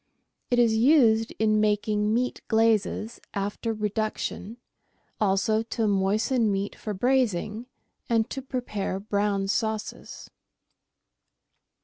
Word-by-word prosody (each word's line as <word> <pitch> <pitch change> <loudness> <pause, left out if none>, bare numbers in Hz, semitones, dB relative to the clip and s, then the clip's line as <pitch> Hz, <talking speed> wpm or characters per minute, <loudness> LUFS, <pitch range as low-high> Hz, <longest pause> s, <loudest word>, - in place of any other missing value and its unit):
It 245 - +2
is 230 -2 +4
used 225 -3 +4
in 215 -1 +2
making 210 0 +1
meat 250 +3 -1
glazes 225 0 +1
after 205 +3 -2
reduction, 215 +1 -3 0.6
also 210 +2 +2
to 225 0 -2
moisten 210 +4 +1
meat 200 +1 -2
for 210 -2 -5
braising 230 -1 0 0.4
and 225 -2 +2
to 270 - -4
prepare 245 -7 -3
brown 200 -1 -1
sauces. 220 +1 -3
215 Hz, 100 wpm, -26 LUFS, 205-230 Hz, 0.6 s, is